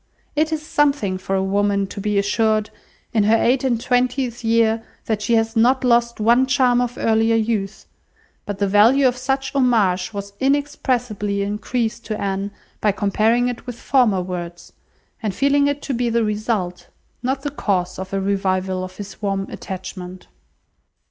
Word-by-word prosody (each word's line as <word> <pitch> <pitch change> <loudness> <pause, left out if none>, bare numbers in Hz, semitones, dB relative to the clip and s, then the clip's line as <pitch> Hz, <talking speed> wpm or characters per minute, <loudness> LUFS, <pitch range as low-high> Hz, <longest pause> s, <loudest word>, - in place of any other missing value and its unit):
It 310 +2 +1
is 310 -1 -3
something 280 - +1
for 195 +1 -2
a 190 - +1
woman 200 +1 +1
to 195 +1 -7
be 210 0 0
assured, 215 +1 +1 0.4
in 220 - +3
her 220 +2 +5
eight 255 +3 +2
and 245 -4 +1
twentieth 250 0 0
year, 225 0 +2 0.2
that 215 -2 -1
she 230 +3 +2
has 225 0 +1
not 250 +4 +3
lost 235 -1 +2
one 235 +4 +4
charm 255 -2 +3
of 245 0 -3
earlier 225 0 +2
youth; 215 -3 -1 0.6
but 205 -1 -3
the 200 - +1
value 230 +8 +5
of 250 - +1
such 270 +1 -2
homage 225 -9 +2
was 200 -1 -6
inexpressibly 250 -7 0
increased 220 +3 -2
to 215 -1 -3
Anne, 195 0 -2 0.3
by 210 - +3
comparing 220 +4 +1
it 245 0 -5
with 245 - -5
former 225 -9 +2
words, 175 -1 -7 0.5
and 210 -4 -2
feeling 280 +1 +3
it 285 0 -2
to 275 - -2
be 240 0 0
the 230 0 +1
result, 210 -4 -2 0.3
not 265 +2 -2
the 290 - -2
cause 185 -10 -1
of 190 0 -6
a 195 - -1
revival 190 -1 -1
of 185 0 -8
his 205 0 -9
warm 195 -1 -1
attachment. 185 -1 -7
220 Hz, 170 wpm, -21 LUFS, 200-250 Hz, 0.6 s, her